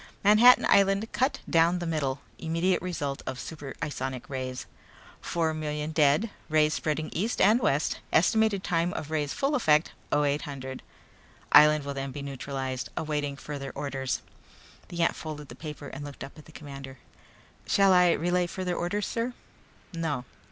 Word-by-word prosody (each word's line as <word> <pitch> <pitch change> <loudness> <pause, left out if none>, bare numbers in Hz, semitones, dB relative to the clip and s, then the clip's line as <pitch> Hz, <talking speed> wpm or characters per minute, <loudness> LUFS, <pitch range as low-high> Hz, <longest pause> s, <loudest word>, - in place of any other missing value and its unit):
Manhattan 215 +5 +7
island 200 +2 +3
cut 260 +2 0
down 165 +1 +3
the 175 - -4
middle 145 -4 -1 0.2
immediate 165 +3 0
result 150 -7 -3
of 130 - -4
super 145 -4 -7
isonic 130 -3 -4
rays; 130 -2 -4 0.6
four 165 -2 0
million 150 0 -3
dead 155 +8 +3 0.2
rays 155 0 +3
spreading 155 0 -2
east 215 +8 -1
and 215 +4 +5
west 150 - +1
estimated 210 +3 +3
time 170 +1 0
of 155 - -5
rays' 150 -2 -1
full 280 +1 0
effect; 155 - +3 0.2
0800 140 -2 -1 0.7
island 150 0 +7
will 140 - -3
then 135 0 -4
be 140 +2 -6
neutralized 135 -1 -4
awaiting 150 -2 -2
further 140 -1 -6
orders." 140 -2 -3 0.6
The 170 -1 -1
ant - - +2
folded 150 -2 -7
the - - -9
paper 150 -2 -8
and 140 - -7
looked 145 -2 -8
up 135 - -10
at 155 - -14
the - - -15
commander. 135 -3 -9 0.7
"Shall 195 -1 +5
I 180 -1 +6
relay 175 +1 +1
further 180 0 -3
orders, 195 +4 -1
sir?" 235 +1 -2 0.6
"No." 160 -6 -2
155 Hz, 155 wpm, -28 LUFS, 140-180 Hz, 0.7 s, Manhattan